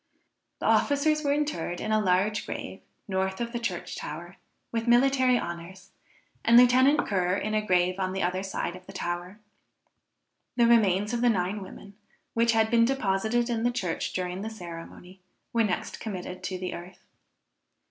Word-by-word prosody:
The - - -6
officers 305 +2 +3
were 285 - +1
interred 285 - -1
in 215 - -3
a 215 - +3
large 195 +3 +1
grave, - - -6 0.3
north 190 -1 -1
of 235 0 -3
the 240 - -3
church 235 - -4
tower, - - -7 0.3
with 230 0 -2
military 255 +1 +4
honors, 175 0 -7 0.5
and 230 +1 +6
Lieutenant 255 +4 +5
Ker 185 -2 +1
in 215 +2 -2
a 215 - +2
grave 185 -2 +1
on 185 -1 -1
the 190 - -2
other 180 +2 0
side 190 -2 -3
of 185 0 -13
the 195 - -10
tower. 175 +1 -4 1.2
The 235 - +4
remains 210 -3 +3
of 235 - -1
the 245 - +4
nine 195 0 0
women, 200 +1 -11 0.4
which 230 0 +3
had 220 -1 +2
been 230 -1 +5
deposited 230 -1 +1
in 235 -2 -1
the 240 - +2
church 195 -9 -3
during 180 0 -3
the 220 - -4
ceremony, 180 -1 -10 0.3
were 230 -1 +3
next 200 -4 -2
committed 185 -4 -6
to 185 - -3
the 180 0 -4
earth. 175 +2 -10
205 Hz, 170 wpm, -27 LUFS, 185-235 Hz, 1.2 s, and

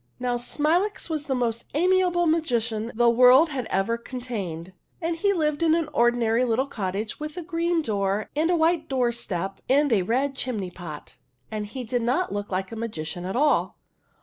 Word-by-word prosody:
Now, 245 -1 0
Smilax 325 - 0
was 305 -2 -2
the 265 - -1
most 235 -2 -1
amiable 360 +1 +3
magician 240 -9 0
the 240 +1 +3
world 250 +6 +6
has 260 -5 -4
ever 195 +5 0
contained, 200 -9 -6 0.3
and 335 -1 -1
he 400 +5 +2
lived 305 -4 0
in 325 -1 +4
an 330 -2 -1
ordinary 240 -1 +3
little 250 +2 +1
cottage 210 -3 -4
with 305 +2 -6
a 355 - -4
green 335 0 0
door 200 -3 -1
and 315 +3 +1
a 355 - +3
white 325 -1 +1
doorstep 235 -8 -1
and 285 0 +4
a 200 - +3
red 260 +9 0
chimney 215 -9 -3
pot, 165 -4 -9 0.3
and 210 -1 -3
he 255 +5 -6
did 245 +1 -1
not 250 - 0
look 205 0 -4
like 190 +2 -2
a - - -5
magician 175 -6 -5
at 190 - -3
all. 295 +4 +2
245 Hz, 180 wpm, -25 LUFS, 215-310 Hz, 0.3 s, world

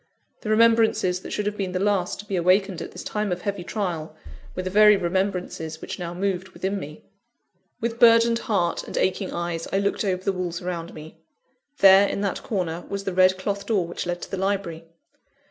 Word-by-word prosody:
The 215 - -6
remembrances 220 -4 +3
that - - -9
should 210 - -2
have 210 0 -1
been 190 -2 -3
the 185 - -1
last 195 -2 0
to - - -18
be 200 - -3
awakened 185 +1 +2
at - - -7
this - - -8
time 210 -2 -2
of 180 0 -3
heavy 200 -3 -3
trial, 170 -3 -4 0.4
were 185 - -3
the 185 - -3
very 210 +1 +7
remembrances 180 -3 -2
which - - -7
now 170 -1 -4
moved 190 0 -2
within 195 +1 -3
me. 150 -3 -9 0.8
With 235 0 -3
burdened 230 0 +6
heart 195 -9 0
and - - -7
aching 190 +1 0
eyes 170 -1 -3
I - - +1
looked 200 +2 0
over 185 -2 -1
the 195 - 0
walls 180 -2 -3
around 175 -2 -5
me. 155 +1 -11 0.6
There, 195 +1 +8
in - - -3
that 200 -2 -2
corner, 175 -5 -3
was 200 0 -4
the 195 - -3
red 185 0 +4
cloth 200 +1 -3
door 200 -6 +1
which 175 0 -5
led 175 0 -3
to - - -9
the 195 - -2
library. 190 -4 -2
190 Hz, 205 wpm, -24 LUFS, 175-200 Hz, 0.8 s, There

